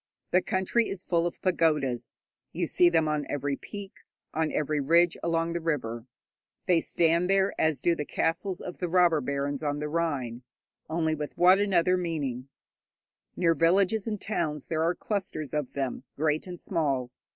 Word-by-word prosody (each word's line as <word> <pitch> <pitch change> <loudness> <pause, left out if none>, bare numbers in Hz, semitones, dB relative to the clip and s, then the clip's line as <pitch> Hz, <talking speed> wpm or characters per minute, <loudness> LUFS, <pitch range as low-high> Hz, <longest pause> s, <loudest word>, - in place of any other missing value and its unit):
The 180 - +4
country 190 +6 0
is 190 -2 -5
full 170 -1 +1
of 175 - -7
pagodas; 150 -9 +1 0.4
you 175 +1 -1
see 175 +2 +4
them 165 -2 +2
on 150 -1 -1
every 145 -1 -1
peak, 200 +6 -9 0.4
on 160 0 0
every 150 0 0
ridge 170 +4 +4
along 165 0 0
the 170 - -2
river. 125 -7 -2 0.6
They 175 -4 +3
stand 170 +2 +2
there 195 0 +3
as 155 -5 +1
do 170 - +3
the 150 - -3
castles 165 +5 -2
of 180 - -7
the 180 - -1
robber 170 -3 +4
barons 140 +1 -2
on 145 -1 -1
the 150 +1 -3
Rhine, 145 -8 -2 0.5
only 160 -1 0
with 150 -1 -5
what 180 +2 +6
another 185 -3 +3
meaning! 140 -7 -3 0.9
Near 170 -2 +3
villages 190 +6 +2
and 210 -2 -2
towns 150 -9 -2
there 160 -1 0
are 170 +2 +1
clusters 185 - -4
of 150 -4 -2
them, 135 -2 -3
great 155 +3 0
and 175 -1 -7
small. 140 -8 -1
165 Hz, 170 wpm, -28 LUFS, 145-180 Hz, 0.9 s, what